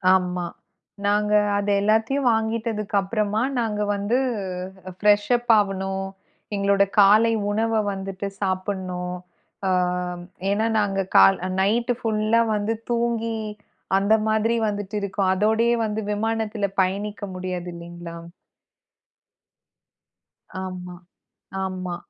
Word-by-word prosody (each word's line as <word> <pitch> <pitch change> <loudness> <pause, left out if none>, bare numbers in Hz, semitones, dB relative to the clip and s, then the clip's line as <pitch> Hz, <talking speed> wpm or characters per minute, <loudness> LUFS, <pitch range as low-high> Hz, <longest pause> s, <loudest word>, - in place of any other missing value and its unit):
ஆமா. 180 -1 -1 0.6
நாங்க 210 +1 +2 0.2
அத 205 - -2
எல்லாத்தையும் 225 +6 +2
வாங்கிட்டதுக்கப்பறமா 215 -2 -1 0.2
நாங்க 215 -3 -1
வந்து 205 +5 0 0.8
ஃபிரஷ்அப் 210 +4 +3
ஆவணும். 195 -1 -1 0.5
எங்களோட 200 0 +3 0.2
காலை 210 +3 +6 0.2
உணவ 225 +2 0 0.2
வந்துட்டு 195 0 -5
சாப்புடணும். 185 -2 -2 0.5
அ - - +2 0.8
ஏன்னா 210 +3 +1
நாங்க 195 -2 0 0.2
கால் 95 0 +7 0.2
நைட்டு 235 +5 +2
ஃபுல்லா 220 +1 +2
வந்து 210 +2 -1 0.2
தூங்கி 230 -1 0 0.6
அந்த 200 +2 +3 0.2
மாதிரி 220 +2 +2
வந்துட்டு 205 0 -4
இருக்கோம். 195 -1 0
அதோடயே 220 +4 +3
வந்து 215 0 -2
விமானத்துல 220 -1 -1 0.2
பயணிக்க 205 +2 -2
முடியாது 180 -1 -4
இல்லீங்களா. 170 0 -9 2.5
ஆமா, 180 -1 -7 0.7
ஆமா. 185 -2 -4
205 Hz, 90 wpm, -23 LUFS, 190-220 Hz, 2.5 s, கால்